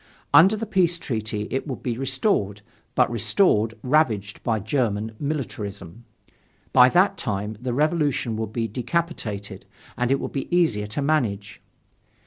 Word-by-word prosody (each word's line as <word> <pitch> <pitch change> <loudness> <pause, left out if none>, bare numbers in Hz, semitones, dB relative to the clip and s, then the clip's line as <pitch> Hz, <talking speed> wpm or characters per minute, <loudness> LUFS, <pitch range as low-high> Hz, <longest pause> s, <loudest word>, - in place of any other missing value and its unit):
Under 190 +6 +7
the 220 +1 -4
peace 185 -5 +2
treaty 110 -7 -4
it 135 - -2
would 130 - -6
be 120 -2 -1
restored, 130 - 0 0.3
but 125 -1 +3
restored 115 - +2
ravaged 120 -8 +1
by 115 -3 0
German 110 -1 -1
militarism. 115 - -5 0.7
By 125 -1 +7
that 190 +7 +3
time 105 +1 -3
the 125 0 -2
revolution 145 -4 0
would 110 -1 -4
be 115 0 -2
decapitated, 110 - -3 0.3
and 125 0 -1
it 135 0 +2
would - - -5
be 135 - -4
easier 110 -13 +2
to 105 +7 -3
manage. 105 -9 -1
120 Hz, 140 wpm, -24 LUFS, 105-150 Hz, 0.7 s, Under